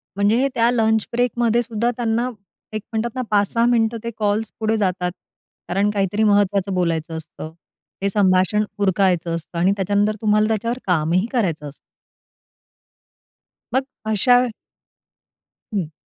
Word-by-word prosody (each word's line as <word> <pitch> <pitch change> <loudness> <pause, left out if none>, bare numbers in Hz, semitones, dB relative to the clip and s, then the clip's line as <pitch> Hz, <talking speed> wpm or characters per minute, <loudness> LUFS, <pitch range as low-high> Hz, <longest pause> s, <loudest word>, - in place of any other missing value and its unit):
म्हणजे 205 +2 +2
हे 275 - +3
त्या 230 0 +3
लंच 220 -2 +2
ब्रेकमध्ये 240 -1 +1
सुद्धा 230 +1 -1
त्यांना, 240 +1 -1 0.4
एक 215 - -3
म्हणतात 225 +2 -2
ना, 255 - -1
5-6 210 +3 +2
मिनिटं 230 -1 +2
ते 235 - -3
कॉल्स 210 0 0
पुढे 220 0 +1
जातात. 180 -3 0 0.6
कारण 200 +3 +1
काहीतरी 205 +1 0
महत्त्वाचं 200 -2 +2
बोलायचं 165 -2 -1
असतं. 160 0 -9 0.5
ते 200 - +1
संभाषण 190 +1 +3 0.2
उरकायच 190 -3 +2
असतं 170 +1 -4
आणि 185 +3 +3
त्याच्यानंतर 205 +2 +1
तुम्हाला 215 0 +3
त्याच्यावर 230 +3 -1
कामही 175 +2 +2
करायचं 170 - -1
असतं. 140 - -16 2.0
मग 265 +1 +1 0.3
अशा 245 +4 +4 1.3
हं. 175 -6 -2
210 Hz, 130 wpm, -21 LUFS, 185-230 Hz, 2.0 s, अशा